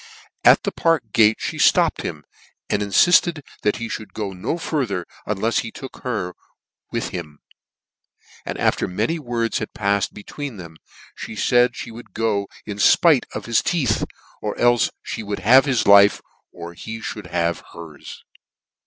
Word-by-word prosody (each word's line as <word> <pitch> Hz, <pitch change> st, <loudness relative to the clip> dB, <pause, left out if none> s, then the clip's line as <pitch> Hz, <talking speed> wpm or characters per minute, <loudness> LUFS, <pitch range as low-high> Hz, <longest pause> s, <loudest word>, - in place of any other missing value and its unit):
At -, -, +6 dB
the -, -, -1 dB
Park 160 Hz, -10 st, 0 dB
gate, 110 Hz, -1 st, +5 dB
fhe -, -, +3 dB
(topped -, -, +1 dB
him, -, -, -6 dB, 0.5 s
and 100 Hz, -, +1 dB
infilled 160 Hz, -, +4 dB, 0.2 s
that 105 Hz, -, +1 dB
he 115 Hz, -, -5 dB
ihould 110 Hz, -1 st, -7 dB
go 100 Hz, -3 st, -4 dB
no 95 Hz, -, -3 dB
farther 125 Hz, -, -2 dB, 0.2 s
unlefs 105 Hz, +3 st, 0 dB
he 115 Hz, -, -4 dB
took 130 Hz, +3 st, -10 dB
her 105 Hz, -8 st, -3 dB, 0.6 s
with -, -, -2 dB
him; 75 Hz, -4 st, -7 dB, 1.1 s
and -, -, -5 dB
after -, -, +1 dB
many 110 Hz, -, -1 dB
words 120 Hz, -4 st, -2 dB
had 110 Hz, -, -6 dB
pa 100 Hz, 0 st, +1 dB
fled -, -, -1 dB
be 105 Hz, -, -11 dB
tween 140 Hz, -3 st, -7 dB
them, 85 Hz, -3 st, -10 dB, 0.5 s
fhe 110 Hz, -, -7 dB, 0.2 s
(aid 120 Hz, 0 st, +4 dB
(he 120 Hz, -, -9 dB
would 110 Hz, -3 st, -12 dB
go 105 Hz, -3 st, 0 dB, 0.2 s
in 105 Hz, -2 st, -6 dB
fpite 150 Hz, +5 st, +5 dB
of -, -, -5 dB
his 115 Hz, -1 st, +2 dB
teeth, 135 Hz, -11 st, 0 dB, 0.4 s
or -, -, -3 dB
cite 120 Hz, -2 st, +3 dB, 0.3 s
me -, -, -4 dB
would 105 Hz, -1 st, -4 dB
have 130 Hz, +6 st, +6 dB
his 130 Hz, -5 st, +1 dB
life, 100 Hz, 0 st, +7 dB, 0.3 s
or 85 Hz, 0 st, -9 dB
he 110 Hz, +5 st, -7 dB, 0.2 s
mould 105 Hz, -, -9 dB
have 85 Hz, -1 st, -1 dB
her's. 80 Hz, -4 st, -11 dB
110 Hz, 170 wpm, -21 LUFS, 100-125 Hz, 1.1 s, life